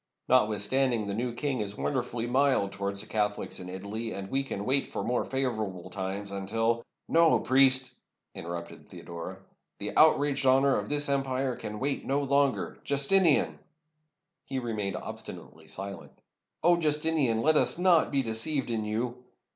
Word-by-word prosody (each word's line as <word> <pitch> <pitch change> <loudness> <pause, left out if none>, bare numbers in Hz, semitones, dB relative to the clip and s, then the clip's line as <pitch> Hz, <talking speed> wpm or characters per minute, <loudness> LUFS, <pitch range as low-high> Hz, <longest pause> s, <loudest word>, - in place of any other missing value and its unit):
Notwithstanding, 115 +1 +2
the 100 - -3
new 120 +4 -2
king 130 0 -2
is 105 0 -5
wonder 130 -3 0
fully 120 -1 -5
mild 130 -5 +2
towards 100 0 -2
the - - -6
Catholics 105 -1 -2
in 90 0 -8
Italy; 100 +5 -5
and 95 0 -7
we 135 - +1
can 105 -7 -5
wait 135 +2 +2
for - - -4
more 125 - 0
favorable 110 -9 -3
times, 100 +1 -4
until 115 +4 -1
— - - -58
" - - -56
"No, 165 -1 +5
priest!" 130 -1 +4 0.4
interrupted 85 0 -8
Theodora; 90 +3 -8 0.3
"the - - -5
outraged 140 -1 +4
honor 135 +1 +4
of - - -3
this 145 0 +2
empire 135 -2 -1
can 105 -1 -6
wait 140 +3 -1
no 140 +1 0
longer! 140 -1 +1
0 - - -27
Justinian!" 150 +4 +4 0.4
— 155 -1 -54
he 135 - -6
still 130 - -2
remained 105 -5 -3
obstinately - - -9
silent 100 +1 -7 0.2
— - - -51
*'0 175 +1 +4
Justinian, 150 -7 +1
let 155 0 +4
us - - +3
not 175 -2 +3
be 140 -2 +1
deceived 120 +4 0
in 110 -2 -1
you 120 +4 -3
125 Hz, 170 wpm, -28 LUFS, 105-140 Hz, 0.4 s, No